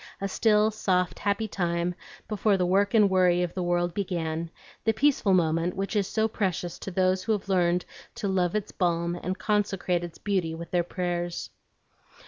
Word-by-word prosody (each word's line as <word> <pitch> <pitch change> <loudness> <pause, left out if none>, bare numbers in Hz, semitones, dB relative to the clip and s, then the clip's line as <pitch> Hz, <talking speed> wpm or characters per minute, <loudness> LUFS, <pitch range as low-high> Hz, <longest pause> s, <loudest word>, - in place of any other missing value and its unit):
A 195 - -1
still, 215 +2 +3
soft, 185 -4 0
happy 205 +2 0
time 175 -3 -1 0.3
before 210 -1 +2
the 180 - +1
work 200 +4 +2
and 210 -2 +6
worry 180 -2 +3
of 175 - -3
the 185 - -3
world 175 0 0
began, 165 -4 -2 0.3
the 225 - +2
peaceful 220 -5 +3
moment 165 0 +1
which 195 +2 -3
is 200 -2 +1
so 220 0 +1
precious 185 -5 -2
to - - -6
those 185 0 +1
who 225 - +1
have 205 -2 -3
learned 180 -1 +2 0.3
to 205 - -3
love 185 -1 +1
its 210 -1 -2
balm 170 -1 0
and 185 +2 -4
consecrate 195 -4 0
its 170 -1 -7
beauty 185 -6 -1
with 170 +1 -8
their 175 - +3
prayers. 175 -1 -3
185 Hz, 180 wpm, -27 LUFS, 175-200 Hz, 0.3 s, and